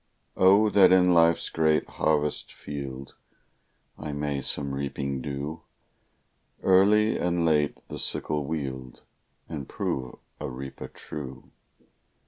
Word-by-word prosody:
Oh, 100 Hz, +3 st, +5 dB
that 95 Hz, -3 st, +6 dB
in 90 Hz, -1 st, +5 dB
life's 85 Hz, 0 st, +4 dB
great 80 Hz, -1 st, +2 dB
harvest 75 Hz, -1 st, 0 dB
field, 70 Hz, -2 st, -7 dB, 0.9 s
I 75 Hz, -1 st, -5 dB
may 70 Hz, -1 st, -2 dB
some 70 Hz, 0 st, -2 dB
reaping 70 Hz, -1 st, -3 dB
do; 70 Hz, +4 st, -5 dB, 1.0 s
Early 105 Hz, +4 st, +4 dB
and 85 Hz, -1 st, 0 dB
late 75 Hz, -3 st, +2 dB
the -, -, -6 dB
sickle 75 Hz, -1 st, -1 dB
wield, 65 Hz, -5 st, -5 dB, 0.4 s
And 75 Hz, -5 st, -6 dB
prove 65 Hz, -1 st, -3 dB, 0.2 s
a -, -, -4 dB
reaper 65 Hz, 0 st, -7 dB
true. 65 Hz, -1 st, -9 dB
75 Hz, 110 wpm, -27 LUFS, 70-85 Hz, 1.0 s, that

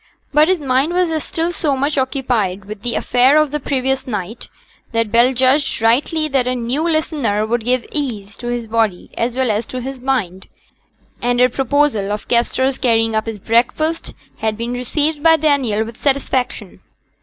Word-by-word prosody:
But 300 Hz, +2 st, +5 dB
his 370 Hz, -1 st, +2 dB
mind 275 Hz, +3 st, +1 dB
was 325 Hz, -4 st, +1 dB
still 335 Hz, +1 st, -2 dB
so 295 Hz, -5 st, -1 dB
much 280 Hz, +3 st, 0 dB
occupied 245 Hz, -8 st, -1 dB
with 210 Hz, 0 st, -8 dB
the 240 Hz, +1 st, -2 dB
affair 255 Hz, +4 st, +3 dB
of 305 Hz, -2 st, +3 dB
the 300 Hz, -, -2 dB
previous 265 Hz, -1 st, -1 dB
night, 210 Hz, -1 st, -5 dB, 0.5 s
that 230 Hz, -2 st, 0 dB
Bell 235 Hz, +3 st, +5 dB
judged 265 Hz, +3 st, +2 dB
rightly 280 Hz, +8 st, +2 dB
that 270 Hz, -4 st, 0 dB
a 255 Hz, -, 0 dB
new 245 Hz, +4 st, -2 dB
listener 290 Hz, -10 st, 0 dB
would 230 Hz, +1 st, -1 dB
give 250 Hz, +1 st, 0 dB
ease 220 Hz, -9 st, -4 dB
to 240 Hz, -, -7 dB
his 240 Hz, -1 st, -2 dB
body 220 Hz, -4 st, -1 dB
as 235 Hz, +1 st, -1 dB
well 260 Hz, -3 st, +1 dB
as 215 Hz, +2 st, -2 dB
to 255 Hz, -, -5 dB
his 265 Hz, +1 st, -6 dB
mind, 230 Hz, -9 st, -2 dB, 0.7 s
and 245 Hz, 0 st, +1 dB
her 250 Hz, 0 st, +5 dB
proposal 265 Hz, -5 st, +1 dB
of 210 Hz, 0 st, -4 dB
Kester's 260 Hz, +2 st, +1 dB
carrying 225 Hz, -2 st, +2 dB
up 220 Hz, +1 st, -1 dB
his 220 Hz, -2 st, -5 dB
breakfast 250 Hz, -, 0 dB, 0.2 s
had 220 Hz, -1 st, -2 dB
been 235 Hz, +2 st, -3 dB
received 290 Hz, +5 st, -1 dB
by 325 Hz, +1 st, +6 dB
Daniel 270 Hz, -8 st, +1 dB
with 230 Hz, 0 st, -10 dB
satisfaction. 270 Hz, -2 st, -2 dB
250 Hz, 180 wpm, -18 LUFS, 225-285 Hz, 0.7 s, by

